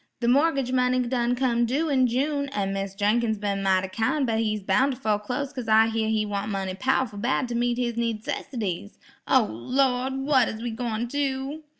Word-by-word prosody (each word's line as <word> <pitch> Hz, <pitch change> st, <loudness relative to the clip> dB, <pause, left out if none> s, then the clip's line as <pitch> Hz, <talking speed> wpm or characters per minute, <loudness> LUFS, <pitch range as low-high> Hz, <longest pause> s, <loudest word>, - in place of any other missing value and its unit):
"The 235 Hz, -, -1 dB
mor'gage 275 Hz, 0 st, +2 dB
money 255 Hz, 0 st, +2 dB
done 245 Hz, 0 st, 0 dB
come 240 Hz, -2 st, +1 dB
due 290 Hz, +7 st, 0 dB
in 260 Hz, -3 st, +3 dB
June, 280 Hz, +3 st, -1 dB
an' 200 Hz, -7 st, -2 dB
Mis' 195 Hz, 0 st, -4 dB
Jenkins 220 Hz, +2 st, +1 dB
been 200 Hz, -1 st, -2 dB
mighty 190 Hz, -1 st, +2 dB
kind, 225 Hz, +9 st, 0 dB
but 225 Hz, -2 st, 0 dB
he's 215 Hz, -2 st, -1 dB
boun' 210 Hz, +9 st, +3 dB
to 260 Hz, -, -3 dB
fo'close 225 Hz, +7 st, -2 dB
cause 250 Hz, -4 st, -6 dB
I 220 Hz, +1 st, +5 dB
hear 220 Hz, -1 st, -1 dB
he 215 Hz, -1 st, +1 dB
want 205 Hz, 0 st, -3 dB
money 190 Hz, -1 st, -2 dB
pow'ful 255 Hz, 0 st, 0 dB
bad 250 Hz, +3 st, 0 dB
to -, -, -3 dB
meet 240 Hz, 0 st, 0 dB
his 240 Hz, -1 st, -1 dB
needcessities. 220 Hz, -, -3 dB, 0.3 s
O, -, -, +5 dB
Lawd! 255 Hz, -, 0 dB
what 270 Hz, -1 st, +3 dB
is 220 Hz, -, -6 dB
we 235 Hz, 0 st, -3 dB
gwine 230 Hz, 0 st, -2 dB
do?" 275 Hz, +3 st, -2 dB
235 Hz, 195 wpm, -25 LUFS, 210-260 Hz, 0.3 s, I